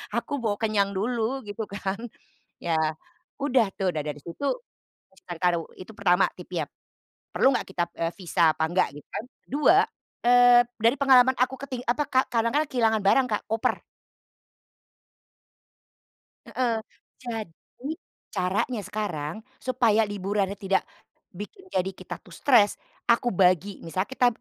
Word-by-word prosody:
aku - - -2
mau 220 -4 0
kenyang 210 -3 +1
dulu, 235 +5 -1
gitu 205 +2 -4
kan. 200 0 -3 0.6
Ya 165 -1 +1 0.7
udah 260 -5 +3
tuh, 190 -1 +1
udah 155 -3 -3
dari 150 -1 -4
situ, 170 +12 -6 0.7
misalkan 175 -2 -9
karo 175 -1 +3 0.2
itu 185 +4 -10
pertama 180 -1 +3
tipsnya. - - -4 0.7
Perlu 270 - +4
enggak - - -1
kita, 175 -2 0
e - - -2
visa 170 -3 +3
apa 160 - +1
enggak, 180 +2 +2
gitu 145 - -12
kan. - - -4 0.2
Ke-2, 300 +6 +4 0.5
eee 245 0 +7 0.2
dari 230 +4 +4
pengalaman 260 -2 +6
aku 255 +2 +2
keting 255 -3 -5
apa, 250 +5 +1
Kak, 260 0 +3
kadang 230 -1 +2
kan 300 +1 +3
kehilangan 225 -5 +2
barang 250 +6 +4
Kak, 210 - 0
koper. 225 0 0 2.6
Heeh. 240 -3 0 0.4
Jadi, 235 - -6 0.4
caranya 210 +6 0
sekarang 175 -7 -3 0.3
supaya 230 -4 +3
liburannya 200 0 -1
tidak 195 -2 +1 0.5
bikin 210 - -9
jadi 185 - 0
kita - - -8
tuh - - -16
stres, 235 -7 +4 0.3
aku 240 +1 +3
bagi. 185 +1 +2
Misalnya 185 +4 -2
kita, 260 -1 +2
215 Hz, 140 wpm, -26 LUFS, 190-245 Hz, 2.6 s, eee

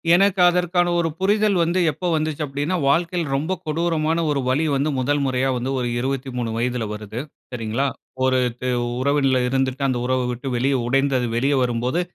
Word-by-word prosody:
எனக்கு 195 +1 +3
அதற்கான 175 0 +1
ஒரு 165 -1 +1
புரிதல் 205 +1 +2
வந்து, 170 +3 +1
எப்போ 180 +5 -4
வந்துச்சு 155 -1 -2
அப்படின்னா, 145 +5 -2
வாழ்க்கையில 170 0 0
ரொம்ப 155 +7 -1
கொடூரமான 160 0 0
ஒரு 145 -2 +1
வலி 145 +5 +2
வந்து, 140 +3 +1
முதல் 145 +3 +1
முறையா 130 0 0
வந்து 125 +2 -2
ஒரு 125 - -1
23 130 -2 -2
வயதுல 120 0 -1
வருது, 105 +2 -6 0.3
சரிங்களா? 120 +3 -1 0.4
ஒரு 130 0 +3 0.2
து 125 - -2 0.3
உறவின்ல 135 -1 +2
இருந்துட்டு, 135 +1 0
அந்த 125 -2 0
உறவ 130 0 +1
விட்டு 125 +3 -5
வெளிய 135 +3 +1
உடைந்து 135 +2 +2
அது 120 -1 -1
வெளிய 135 +4 +2
வரும்போது, 125 +6 0
140 Hz, 170 wpm, -22 LUFS, 125-165 Hz, 0.4 s, எனக்கு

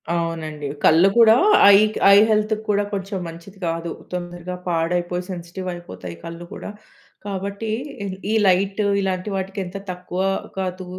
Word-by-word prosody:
అవునండి. 160 -3 -3 0.2
కళ్ళు 165 +4 +6
కూడా 230 -1 +8 0.4
ఐ - - +9 0.4
ఐ - - +8
హెల్త్‌కి 215 0 +1
కూడా 205 0 +2
కొంచెం 195 0 -3
మంచిది 170 +4 -11
కాదు. 165 0 -3 0.2
తొందరగా 175 0 -5
పాడైపోయి 175 +1 -1
సెన్సిటివ్ 180 +1 -7
అయిపోతాయి 95 - -9
కళ్ళు 170 +1 -7
కూడా. - - -7 0.6
కాబట్టి 200 +2 -4 0.6
ఈ - - +1
లైట్ 195 +3 +2 0.2
ఇలాంటి 190 +1 -2
వాటికి 190 +1 -4
ఎంత 180 +2 -7
తక్కువ 180 +1 -5 0.4
కాదు 185 0 -3
180 Hz, 130 wpm, -22 LUFS, 170-195 Hz, 0.6 s, ఐ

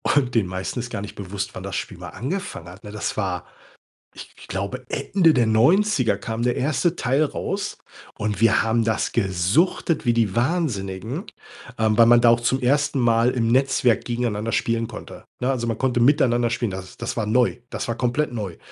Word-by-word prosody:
und 130 -4 +2
den 110 -6 +2
meisten 95 +6 -4
ist 120 0 -5
gar - - -4
nicht 105 - -8
bewusst, 100 0 -5
wann 95 - -7
das 100 0 -5
Spiel - - -5
mal - - -8
angefangen 180 - -5
hat, 95 +4 -13
ne, 105 - -8
das 105 - -3
war, 90 -4 -2 0.7
ich - - -13
glaube, - - -4
Ende 170 -5 +2
der 120 -3 +3
90er 125 - +3
kam 110 +3 -4
der 120 0 +1
1. 155 +5 +1
Teil 135 +5 +2
raus 195 +6 -3 0.4
und 105 -1 -2
wir 115 -1 +5
haben 115 +1 +1
das 110 0 0
gesuchtet 115 - +1
wie 120 - +3
die 115 -3 +1
Wahnsinnigen, 120 - -1 0.5
ähm, 110 -1 +1
weil 115 - +7
man 120 0 +6
da 120 - +6
auch 115 0 +4
zum 130 +3 0
1. 145 +2 +1
Mal 115 0 +3
im 120 -3 0
Netzwerk 130 -2 +2
gegeneinander 115 -2 -2
spielen 115 0 0
konnte, 110 - -10 0.2
ne? 125 - 0
Also 125 -3 -2
man 115 -2 -1
konnte 125 -1 0
miteinander 120 -3 +3
spielen, 120 -3 -2
das 95 0 -8
das 115 - -4
war 110 - 0
neu, 120 +3 +2
das - - -4
war 115 - -2
komplett 125 +2 0
neu. 100 -7 -5
120 Hz, 195 wpm, -23 LUFS, 105-130 Hz, 0.7 s, weil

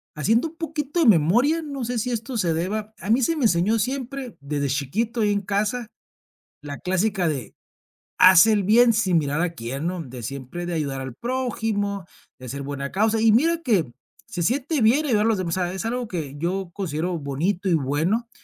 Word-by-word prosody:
haciendo 225 - +1
un 330 - -20
poquito 315 -1 -3
de 325 - +4
memoria, 230 - +4
no 280 -4 -5
sé 245 +1 -2
si 245 +3 -1
esto 235 +2 -3
se 175 -6 +1
deba 210 +6 -3
A 200 - -7
mí 235 +4 +4
se 325 +7 +1
me 295 - -2
enseñó 210 +4 +2
siempre, 260 +1 -3
desde 140 0 -2
chiquito 200 - -1
ahí 210 -1 +2
en 200 0 0
casa, 210 +4 -1 0.7
la 145 -1 -7
clásica 185 0 0
de: 145 -5 -4 0.6
"Haz 185 +1 +8
el 210 -2 +3
bien 230 +4 +5
sin 190 -5 +2
mirar 150 +1 0
a 175 -1 -1
quién", 135 +5 -4
¿no?, 180 -1 -3
de 125 -3 -9
siempre 140 +7 -6
de 175 - -3
ayudar 140 -4 -2
al 130 -2 -7
prójimo, 220 - -2 0.3
de 130 -1 -9
ser 140 +2 -5
buena 140 0 -5
causa 220 +3 +1
y 225 0 +5
mira 330 +9 +3
que, 215 - +3
mm, 120 -4 -15 0.3
se 175 -7 -3
siente 275 - 0
bien 260 +8 +3
ayudar 215 -4 +2
a - - +3
los 220 - +2
demás. 175 -1 -2
O - - 0
sea, 175 0 -1
es 190 +3 -4
algo 245 +1 -2
que 155 -8 -5
yo 180 +4 -2
considero 175 -2 -2
bonito 165 +7 -2
y - - +3
bueno, 160 - 0
200 Hz, 210 wpm, -23 LUFS, 160-235 Hz, 0.7 s, Haz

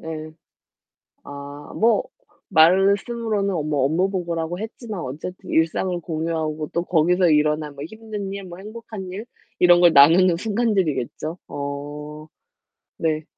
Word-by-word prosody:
예. 155 -1 -6 0.9
아 145 +1 -9
뭐 225 -1 +3 0.5
말씀으로는 195 +1 +2
뭐 145 -3 +1
업무 175 +7 +1
보고라고 170 -2 -3
했지만 220 -2 -6
어쨌든 155 +6 -7
일상을 175 +2 +1
공유하고 160 -2 -3
또 170 +1 -1
거기서 175 +1 +3
일어난 150 -1 +1
뭐 140 +1 -7
힘든 210 0 -6
일, 200 -1 -6
뭐 175 -1 -10
행복한 215 -1 -8
일, 210 +5 -7 0.3
이런 175 -1 +6
걸 175 -2 +6
나누는 165 +5 +6
순간들이겠죠. 185 - -1
어. 145 +2 -6 0.7
네. 155 -1 -1
170 Hz, 260 characters per minute, -22 LUFS, 155-195 Hz, 0.9 s, 이런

